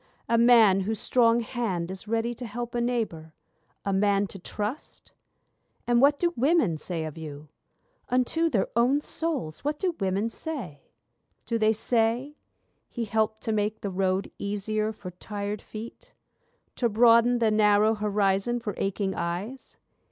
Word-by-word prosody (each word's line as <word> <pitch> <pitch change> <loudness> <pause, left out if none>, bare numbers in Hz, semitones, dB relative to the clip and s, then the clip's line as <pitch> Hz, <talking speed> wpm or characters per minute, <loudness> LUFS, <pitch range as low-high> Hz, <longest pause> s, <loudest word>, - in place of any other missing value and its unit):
A 235 - +2
man 230 -5 +6
whose 210 +2 -2
strong 235 -1 +3
hand 205 -8 -3
is 190 +2 -8
ready 230 +2 0
to 245 +1 -7
help 240 +2 -5
a 240 - 0
neighbour, 215 -10 -2 0.5
A 200 - 0
man 200 +1 +2
to 195 - -9
trust'? 210 - -6 0.7
And 240 0 +3
what 285 +1 +5
do 345 +1 0
women 255 - +2
say 165 -1 -3
of 155 +1 -7
you? 150 -1 -8 0.6
Unto 255 +7 +1
their 220 -10 +1
own 250 +5 +3
souls 295 - -3
what 295 +1 -1
do 360 +1 -1
women 195 +2 0
say? 230 - -6 0.6
Do 230 -1 -1
they 220 0 +4
say: 235 +5 0 0.5
'He 235 -2 -4
helped 220 0 -1
to 225 - -1
make 215 0 -1
the 200 - -3
road 190 +1 0
easier 215 +2 -2
for 200 -4 -9
tired 205 +3 -5
feet? 235 - -10 0.6
To 235 - +1
broaden 235 +2 +5
the 225 -2 +2
narrow 215 0 +4
horizon 210 +2 0
for 215 -3 -4
aching 195 0 -1
eyes? 180 +10 -5
220 Hz, 150 wpm, -27 LUFS, 195-240 Hz, 0.7 s, man